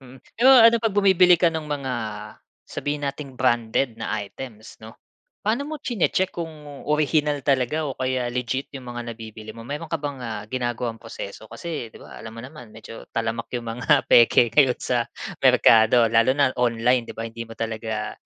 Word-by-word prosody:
Mm. 130 Hz, 0 st, -14 dB, 0.2 s
Pero 255 Hz, +3 st, +6 dB
ano, 230 Hz, -2 st, +8 dB
'pag 225 Hz, -3 st, -1 dB
bumibili 185 Hz, -3 st, +5 dB
ka 170 Hz, 0 st, +3 dB
no'ng 160 Hz, -2 st, -5 dB
mga, 140 Hz, -3 st, -3 dB, 0.7 s
sabihin 145 Hz, 0 st, -4 dB
nating 140 Hz, -1 st, -5 dB
branded 120 Hz, -1 st, 0 dB
na -, -, -3 dB
items, 110 Hz, +1 st, -10 dB
'no, 110 Hz, 0 st, -12 dB, 0.5 s
paano 230 Hz, +7 st, 0 dB
mo 305 Hz, -1 st, -6 dB
chine-check 190 Hz, -, 0 dB
kung 170 Hz, -2 st, -4 dB, 0.4 s
orihinal 150 Hz, -1 st, +1 dB
talaga 140 Hz, +3 st, 0 dB
o 135 Hz, -, -6 dB
kaya 130 Hz, -1 st, -1 dB
legit, 125 Hz, +2 st, -3 dB
yung 130 Hz, -, -10 dB
mga 120 Hz, -1 st, -6 dB
nabibili 110 Hz, -1 st, -11 dB
mo. 115 Hz, -, -10 dB
Meron 145 Hz, +6 st, -6 dB
ka 165 Hz, -, -1 dB
bang, 145 Hz, -3 st, -6 dB
ah, 110 Hz, -4 st, -5 dB
ginagawang 120 Hz, -1 st, -3 dB
proseso, 110 Hz, -2 st, -9 dB
kasi 145 Hz, +1 st, -6 dB
'di -, -, -15 dB
ba, -, -, -12 dB
alam 115 Hz, -, -9 dB
mo -, -, -7 dB
naman, 130 Hz, -3 st, -11 dB
medyo 110 Hz, +1 st, -11 dB
talamak 115 Hz, 0 st, -2 dB
yung 120 Hz, -1 st, -6 dB
mga 135 Hz, +4 st, +2 dB
peke 120 Hz, 0 st, +5 dB
ngayon 135 Hz, -4 st, +4 dB
sa 120 Hz, -2 st, -1 dB, 0.3 s
merkado. 115 Hz, +1 st, +6 dB
Lalo 115 Hz, +4 st, +3 dB
na 140 Hz, -3 st, +3 dB
online, 120 Hz, 0 st, +2 dB
'di -, -, -7 dB
ba, 115 Hz, -, -4 dB
hindi 115 Hz, +1 st, -6 dB
mo 115 Hz, -, -9 dB
talaga 110 Hz, -1 st, -4 dB
125 Hz, 180 wpm, -23 LUFS, 115-150 Hz, 0.7 s, ano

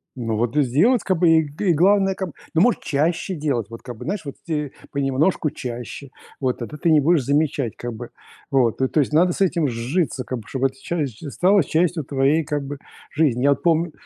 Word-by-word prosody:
Ну, 115 Hz, -3 st, -2 dB
вот 115 Hz, +3 st, -1 dB
и 150 Hz, -, +5 dB
сделать, 175 Hz, -, +3 dB
как 185 Hz, -3 st, 0 dB
бы, 175 Hz, -1 st, +4 dB
и 160 Hz, 0 st, +5 dB
г 155 Hz, +6 st, -1 dB
главное, 195 Hz, +4 st, +3 dB
как 190 Hz, -1 st, -4 dB
бы, -, -, -14 dB, 0.2 s
ну, 165 Hz, -, +4 dB
может, 240 Hz, +4 st, +3 dB
чаще 165 Hz, +5 st, -1 dB
делать, 140 Hz, -, -1 dB
вот, 115 Hz, 0 st, -10 dB
как 120 Hz, -2 st, -8 dB
бы, -, -, -9 dB
знаешь, 200 Hz, +5 st, -2 dB
вот 140 Hz, -, -6 dB
те 150 Hz, -4 st, -2 dB, 0.2 s
понемножку 140 Hz, +3 st, +1 dB
чаще. 125 Hz, +3 st, -7 dB, 0.3 s
Вот, 130 Hz, -2 st, -1 dB
тогда 130 Hz, +5 st, -7 dB
ты 165 Hz, -, +1 dB
не 155 Hz, -2 st, +6 dB
будешь 155 Hz, 0 st, +3 dB
замечать, 140 Hz, -3 st, 0 dB
как 120 Hz, 0 st, -6 dB
бы, 115 Hz, +2 st, -8 dB, 0.4 s
вот. 130 Hz, -6 st, +2 dB
То 130 Hz, -, +1 dB
то 155 Hz, -, 0 dB
есть 145 Hz, +1 st, 0 dB
надо 175 Hz, +3 st, +4 dB
с -, -, -6 dB
этим 170 Hz, -5 st, +2 dB
сжиться, 130 Hz, +4 st, -1 dB
как 125 Hz, 0 st, -4 dB
бы, -, -, -11 dB
чтобы 135 Hz, +3 st, 0 dB
это 135 Hz, 0 st, -13 dB
часть 145 Hz, -10 st, -3 dB
ж 150 Hz, -, -7 dB
стало 185 Hz, +5 st, +3 dB
частью 165 Hz, +2 st, 0 dB
твоей, 140 Hz, +4 st, +1 dB
как 145 Hz, -1 st, -3 dB
бы, 140 Hz, 0 st, -6 dB, 0.3 s
жизни. 140 Hz, -6 st, +1 dB
Я 140 Hz, -, +5 dB
вот 140 Hz, -, 0 dB
помню, 170 Hz, 0 st, +2 dB
145 Hz, 230 wpm, -22 LUFS, 130-170 Hz, 0.4 s, не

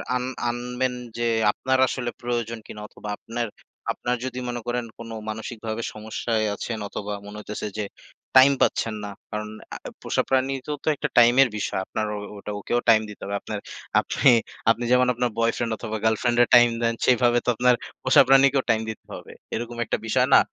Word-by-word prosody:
আন 125 Hz, -, 0 dB, 0.3 s
আনবেন 125 Hz, +1 st, -2 dB, 0.2 s
যে, 120 Hz, -, -1 dB, 0.3 s
আপনার 130 Hz, +3 st, 0 dB
আসলে 120 Hz, -2 st, -2 dB
প্রয়োজন 120 Hz, -1 st, -2 dB
কিনা 105 Hz, -, -9 dB
অথবা 105 Hz, -, -9 dB
আপনার, 115 Hz, 0 st, -4 dB, 0.4 s
আপনার, 125 Hz, 0 st, -2 dB
যদি 125 Hz, -1 st, -4 dB
মনে 120 Hz, -1 st, -3 dB
করেন 120 Hz, 0 st, -1 dB
কোন 115 Hz, 0 st, -9 dB, 0.2 s
মানসিকভাবে 110 Hz, 0 st, -5 dB
সমস্যায় 110 Hz, +1 st, -2 dB
আছেন 115 Hz, +1 st, -4 dB
অথবা 105 Hz, 0 st, -5 dB
মনে 105 Hz, +1 st, -9 dB
হইতেছে 105 Hz, 0 st, -5 dB
যে, 105 Hz, -, -1 dB, 0.5 s
টাইম 135 Hz, +2 st, +9 dB
পাচ্ছেন 110 Hz, -1 st, +1 dB
না। 105 Hz, -, -4 dB, 0.2 s
কারণ 105 Hz, 0 st, -4 dB, 0.3 s
আ -, -, -4 dB, 0.2 s
পোষা -, -, 0 dB
প্রাণীরও 135 Hz, +2 st, 0 dB
তো -, -, -12 dB
একটা 150 Hz, -, -2 dB
টাইমের 120 Hz, +3 st, +7 dB
বিষয়। 100 Hz, -, -2 dB
আপনার 110 Hz, -, -2 dB
ও -, -, -4 dB, 0.2 s
ওটা 105 Hz, +1 st, -6 dB
ওকেও 120 Hz, +4 st, 0 dB
টাইম 110 Hz, -1 st, +7 dB
দিতে 105 Hz, -, -11 dB
হবে। 100 Hz, +1 st, -3 dB
আপনার 105 Hz, -1 st, -5 dB, 0.4 s
আপনি 135 Hz, -, +3 dB, 0.4 s
আপনি 120 Hz, +1 st, +2 dB
যেমন 125 Hz, 0 st, +5 dB
আপনার 120 Hz, +1 st, 0 dB
বয়ফ্রেন্ড 115 Hz, 0 st, +1 dB
অথবা 110 Hz, -1 st, -4 dB
গার্লফ্রেন্ড 110 Hz, +2 st, +2 dB
এর -, -, 0 dB
টাইম 120 Hz, 0 st, +8 dB
দেন 115 Hz, 0 st, +2 dB
সেভাবে 120 Hz, -1 st, +4 dB
তো -, -, +1 dB
আপনার 125 Hz, +2 st, +4 dB, 0.3 s
পোষা -, -, +7 dB
প্রাণীকেও 135 Hz, 0 st, +5 dB
টাইম 110 Hz, -1 st, +3 dB
দিতে 110 Hz, -, -8 dB
হবে। -, -, -9 dB, 0.2 s
এরকম 120 Hz, +1 st, -4 dB
একটা -, -, -1 dB
বিষয় 125 Hz, +3 st, +3 dB
না? -, -, +10 dB
120 Hz, 180 wpm, -24 LUFS, 110-125 Hz, 0.5 s, না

